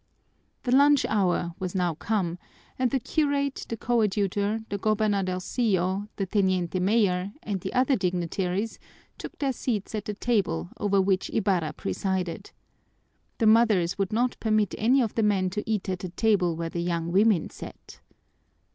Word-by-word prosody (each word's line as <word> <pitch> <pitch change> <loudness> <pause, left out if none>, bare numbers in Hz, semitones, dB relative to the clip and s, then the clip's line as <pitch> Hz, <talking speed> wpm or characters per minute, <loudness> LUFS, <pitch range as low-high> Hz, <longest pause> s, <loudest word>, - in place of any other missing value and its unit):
The 250 - -1
lunch 285 0 +5
hour 180 -4 0
was 185 0 -4
now 180 -2 +1
come, 180 0 -2 0.4
and 255 -1 +2
the 270 - 0
curate, 280 +1 -1
the 230 - -3
coadjutor, 210 -2 0
the 200 - -3
gobernadorcillo, 200 -1 0
the 195 - -2
teniente 185 -2 0
mayor, 195 -1 +1
and 200 -3 -3
the - - -4
other 260 +2 +3
dignitaries 185 +2 -2 0.4
took - - -8
their 275 -3 0
seats 225 -5 -3
at 215 -2 -3
the 210 - -4
table 195 - -1
over 200 -1 +1
which 190 0 +1
Ibarra 180 -8 0
presided. 180 - -3 0.9
The 225 - +1
mothers 215 -6 +4
would 195 -2 0
not 240 +3 0
permit 215 -3 +1
any 250 +4 +3
of 220 - -3
the 225 - 0
men 195 -3 +2
to 210 +3 -3
eat 215 -3 -1
at 185 -1 -2
the 185 - -5
table 185 -3 +1
where 165 0 -3
the 170 - -3
young 170 -1 -2
women 200 -2 +3
sat. - - -11
200 Hz, 155 wpm, -26 LUFS, 180-225 Hz, 0.9 s, lunch